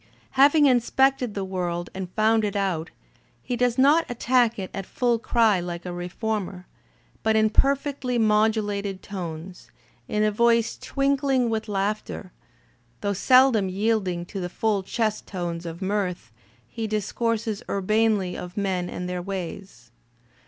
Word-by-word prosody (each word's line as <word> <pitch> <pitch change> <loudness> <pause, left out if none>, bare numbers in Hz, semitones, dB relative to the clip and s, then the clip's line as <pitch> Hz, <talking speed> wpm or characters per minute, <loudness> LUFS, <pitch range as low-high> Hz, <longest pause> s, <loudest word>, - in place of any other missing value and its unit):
Having 285 +3 +5
inspected 255 -1 +2
the 195 -1 -2
world 175 -2 -3
and 190 -1 -5
found 220 +1 +3
it 205 -1 -2
out, 185 -5 -1 0.5
he 245 - -2
does 245 0 +1
not 290 +5 +5
attack 245 -1 +2
it 190 -2 -5
at 195 -1 -5
full 240 -2 +1
cry 225 -4 +3
like 175 0 -5
a 180 - -4
reformer; 185 +1 -4 0.6
but 220 0 +2
in 215 0 +3
iierfectly 275 -1 +1
modulated 210 -3 +1
tones, 175 -2 -7 0.4
in 210 0 0
a 215 - +3
voice 230 +1 +2
twinkling 275 -3 0
with 220 0 -2
laughter, 200 -1 -3 0.7
though 200 - 0
seldom 245 -1 +4
yielding 190 -3 0
to 195 - -6
the 175 -1 -3
full 210 +1 0
chest 215 +2 -2
tones 175 -2 -4
of 165 +3 -6
mirth, 190 - -2 0.4
he 225 - -4
discourses 215 +1 -1
urbanely 205 -1 +1
of 180 +2 -8
men 185 -3 -1
and 180 - -5
their 180 0 -3
ways. 180 -9 -7
210 Hz, 140 wpm, -25 LUFS, 185-230 Hz, 0.7 s, Having